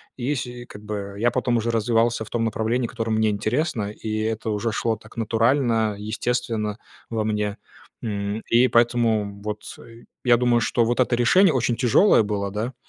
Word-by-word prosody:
и, 130 Hz, +3 st, -2 dB
сь 125 Hz, -, -3 dB
и 120 Hz, 0 st, -9 dB
как 105 Hz, -3 st, -12 dB
бы, 100 Hz, -1 st, -5 dB
я 120 Hz, +3 st, +2 dB
потом 120 Hz, -1 st, 0 dB
уже 115 Hz, +1 st, -1 dB
развивался 115 Hz, 0 st, +1 dB
в -, -, -13 dB
том 115 Hz, -1 st, -1 dB
направлении, 115 Hz, +2 st, -1 dB
которое 115 Hz, -2 st, -4 dB
мне 110 Hz, 0 st, +2 dB
интересно, 110 Hz, +1 st, -1 dB
и 110 Hz, 0 st, -4 dB
это 110 Hz, 0 st, -2 dB
уже 105 Hz, +2 st, -1 dB
шло 115 Hz, 0 st, 0 dB
так 110 Hz, +2 st, -17 dB
натурально, 115 Hz, -1 st, +1 dB
естественно 110 Hz, 0 st, -2 dB, 0.3 s
во 110 Hz, -2 st, -1 dB
мне, 105 Hz, -1 st, -1 dB, 0.4 s
м. 105 Hz, -1 st, -3 dB
И 120 Hz, +2 st, +5 dB
поэтому 115 Hz, -4 st, +1 dB
вот, 105 Hz, 0 st, -4 dB, 0.2 s
э, 115 Hz, 0 st, -15 dB, 0.2 s
я 120 Hz, -2 st, +5 dB
думаю, 120 Hz, -1 st, +2 dB
что 120 Hz, -, +1 dB
вот 120 Hz, +2 st, -1 dB
это 125 Hz, -1 st, +3 dB
решение 160 Hz, +9 st, +4 dB
очень 125 Hz, -2 st, +1 dB
тяжелое 125 Hz, -, +4 dB
было, 100 Hz, -1 st, -2 dB
да, 110 Hz, +5 st, -3 dB
115 Hz, 180 wpm, -23 LUFS, 105-120 Hz, 0.4 s, И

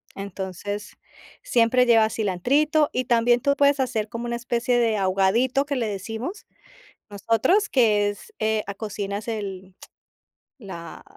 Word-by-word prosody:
Entonces, 200 Hz, +1 st, -6 dB, 0.5 s
siempre 250 Hz, -, +3 dB
lleva 225 Hz, -2 st, +4 dB
cilantrito 275 Hz, -, +1 dB
y 255 Hz, -1 st, -1 dB
también 240 Hz, 0 st, +3 dB
tú 280 Hz, 0 st, +2 dB
puedes 280 Hz, -1 st, +3 dB
hacer 225 Hz, -5 st, -1 dB
como 235 Hz, +1 st, -5 dB
una 235 Hz, 0 st, -2 dB
especie 240 Hz, 0 st, 0 dB
de 225 Hz, -2 st, +2 dB
ahogadito, 195 Hz, +8 st, +2 dB
que 285 Hz, -1 st, -3 dB
le 235 Hz, -3 st, -1 dB
decimos 225 Hz, -, -5 dB, 0.6 s
nosotros, 230 Hz, -, +1 dB
que 210 Hz, -5 st, +3 dB
es, 315 Hz, -, -10 dB
eh, 220 Hz, -1 st, 0 dB
cocinas 205 Hz, 0 st, -5 dB
el 195 Hz, -4 st, -5 dB, 0.9 s
la 170 Hz, -4 st, -9 dB
225 Hz, 130 wpm, -24 LUFS, 205-250 Hz, 0.9 s, lleva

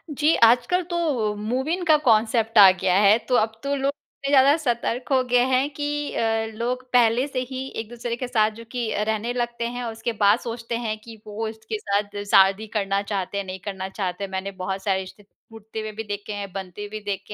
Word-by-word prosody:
जी, 305 Hz, +3 st, +3 dB
आजकल 240 Hz, +10 st, +4 dB
तो 285 Hz, -12 st, 0 dB
move 240 Hz, +6 st, -2 dB
in 355 Hz, +2 st, -1 dB
का 315 Hz, -2 st, +6 dB
कॉन्सेप्ट 225 Hz, 0 st, +2 dB
आ 200 Hz, -2 st, +11 dB
गया 185 Hz, -1 st, 0 dB
है। 205 Hz, +1 st, +6 dB
तो 250 Hz, -, +3 dB
अब 220 Hz, -1 st, +1 dB
तो 280 Hz, 0 st, -1 dB
लोग 270 Hz, 0 st, -1 dB
इतने 280 Hz, -1 st, -9 dB
ज़्यादा 275 Hz, +1 st, +6 dB
सतर्क 245 Hz, -4 st, -2 dB
हो 260 Hz, -1 st, +4 dB
गए 245 Hz, -, +5 dB
हैं 260 Hz, +2 st, +2 dB
कि 290 Hz, 0 st, -3 dB
अ, 225 Hz, -1 st, 0 dB
लोग 245 Hz, +3 st, -2 dB
पहले 240 Hz, +1 st, +4 dB
से 270 Hz, -3 st, -3 dB
ही 260 Hz, 0 st, -5 dB
एक-दूसरे 235 Hz, +1 st, -5 dB
के 250 Hz, +1 st, -4 dB
साथ 220 Hz, -3 st, +2 dB
जो -, -, -8 dB
कि 245 Hz, -2 st, -2 dB, 0.2 s
रहने 220 Hz, +2 st, -1 dB
लगते 240 Hz, -1 st, -2 dB
हैं 245 Hz, +1 st, -5 dB
और 230 Hz, -, -3 dB
उसके 225 Hz, +1 st, -3 dB
बाद 205 Hz, +3 st, +5 dB
सोचते 235 Hz, 0 st, -5 dB
हैं 215 Hz, -1 st, -2 dB
कि 225 Hz, 0 st, -12 dB
वो 215 Hz, +2 st, -4 dB
इसके 220 Hz, 0 st, -5 dB
साथ 205 Hz, 0 st, -2 dB
शादी 195 Hz, +3 st, +5 dB
करना 195 Hz, -1 st, 0 dB
चाहते 200 Hz, -1 st, -3 dB
हैं 200 Hz, -, -1 dB
या -, -, -15 dB
नहीं 185 Hz, 0 st, -6 dB
करना 190 Hz, -2 st, -4 dB
चाहते 190 Hz, -1 st, -4 dB
हैं। 195 Hz, -, -5 dB
मैंने 190 Hz, +1 st, -3 dB
बहुत 190 Hz, +1 st, -3 dB
सारे 190 Hz, -2 st, +1 dB
रिश्ते 190 Hz, +2 st, -10 dB, 0.3 s
टूटते 220 Hz, 0 st, -9 dB
हुए 215 Hz, 0 st, -4 dB
भी 220 Hz, -, -4 dB
देखे 205 Hz, 0 st, -5 dB
हैं, 200 Hz, -1 st, -5 dB
बनते 195 Hz, +1 st, -6 dB
भी 215 Hz, +1 st, -6 dB
देखे 200 Hz, 0 st, -4 dB
225 Hz, 220 wpm, -24 LUFS, 205-245 Hz, 0.3 s, आ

